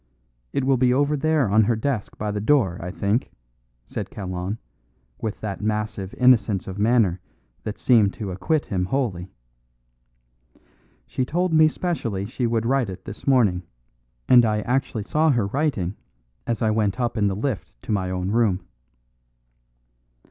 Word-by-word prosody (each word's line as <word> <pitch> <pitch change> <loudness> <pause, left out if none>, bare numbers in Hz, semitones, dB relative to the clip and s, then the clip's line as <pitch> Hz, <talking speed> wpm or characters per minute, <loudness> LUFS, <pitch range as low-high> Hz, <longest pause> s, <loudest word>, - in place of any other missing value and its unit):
"It 140 - -1
will 135 0 +3
be 125 0 +3
over 145 +2 +2
there 155 -3 +2
on 110 +2 +4
her 115 - +2
desk 110 -1 -3
by 105 0 -2
the 105 0 -3
door, 110 -8 +2
I 90 - -4
think," 100 +6 -1 0.6
said - - -5
Kalon, 95 +1 -4 0.6
with 110 -2 -4
that 105 -2 -4
massive 105 -2 -2
innocence 110 -6 +3
of 95 +1 -6
manner 105 -5 +3 0.5
that 105 - -4
seemed 110 -6 +4
to 105 -5 -5
acquit 140 - 0
him 90 -2 -1
wholly. 95 -6 -2 1.8
"She 130 - -2
told 175 +6 0
me 155 0 +7
specially 125 - -2
she 120 +3 -2
would 115 -1 0
write 130 -3 +1
it 95 - -8
this 100 - -9
morning, 110 -10 +3 0.7
and 125 -1 +7
I 105 -2 +1
actually 125 -3 -1
saw 155 +8 +2
her 120 -7 +2
writing 105 - -1 0.5
as 115 -1 -1
I 110 - +3
went 105 0 0
up 120 -2 0
in 105 -3 +2
the 95 - 0
lift 105 - -4
to - - -5
my 95 -3 0
own 90 +1 -2
room." 105 -5 +2
110 Hz, 160 wpm, -23 LUFS, 100-130 Hz, 1.8 s, me